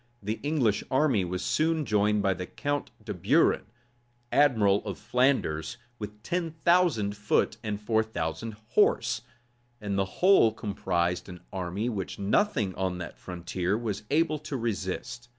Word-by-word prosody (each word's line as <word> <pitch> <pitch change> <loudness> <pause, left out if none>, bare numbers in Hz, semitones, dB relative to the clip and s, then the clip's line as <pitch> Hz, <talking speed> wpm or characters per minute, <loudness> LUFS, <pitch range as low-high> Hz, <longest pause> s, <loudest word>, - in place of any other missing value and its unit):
The 110 +3 -2
English 130 -8 +1
army 130 -6 +3
was 90 +1 -3
soon 160 - +1
joined 105 -1 +2
by 95 -1 +3
the 90 0 -6
count 145 0 -2 0.2
de - - -3
Buren, - - +2 0.6
admiral 110 -9 +4
of 100 -4 -5
Flanders, 105 - +1 0.2
with 105 0 -8
ten 175 +3 -1 0.2
thousand 165 - +3
foot 105 0 +1
and 105 -2 -3
four 110 +1 +2
thousand 110 +1 -4
horse; 120 - +2 0.6
and 100 -2 -2
the 95 - +2 0.2
whole 185 - +6
composed 90 -5 -1
an 90 -1 -9
army 95 +4 -2
which 100 -6 -3
nothing 105 - +1
on 95 -1 -2
that 90 -1 -7
frontier 90 +2 -2
was 110 -4 -3
able 155 0 +2
to 150 -2 -4
resist. 120 +2 -4
105 Hz, 145 wpm, -28 LUFS, 95-130 Hz, 0.6 s, whole